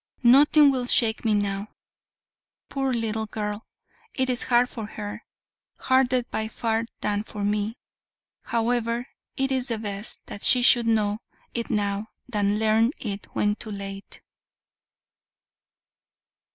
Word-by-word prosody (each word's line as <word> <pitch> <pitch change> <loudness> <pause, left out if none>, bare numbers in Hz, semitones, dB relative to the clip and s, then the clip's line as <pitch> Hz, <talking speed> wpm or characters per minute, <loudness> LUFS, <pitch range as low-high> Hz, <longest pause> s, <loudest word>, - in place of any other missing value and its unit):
Nothing 285 +4 +7
will 255 -2 -2
shake 225 -2 +3
me 220 -2 +2
now. 200 0 -1 1.0
Poor 270 -1 -1
little 220 -2 -1
girl! 210 0 -5 0.5
it 260 -1 +1
is 245 - -1
hard 245 0 +4
for 225 -4 -7
her, 205 -1 -7 0.5
harder 260 -1 +2
by 220 -2 -3
far 225 0 -1
than 205 0 0
for 210 -1 -6
me. 210 +3 -1 0.7
However, 235 +1 -1 0.3
it 270 0 0
is 260 -1 0
best 215 -3 -2
that 200 - -8
she 250 -1 +5
should 240 -1 +5
know 215 -2 +1 0.3
it 235 -1 -3
now, 205 0 -1 0.2
than 205 -3 0
learn 220 +3 +3
it 200 -3 -5
when 205 0 +2
too 220 - -5
late." 195 -1 -7
225 Hz, 125 wpm, -25 LUFS, 210-245 Hz, 1.0 s, Nothing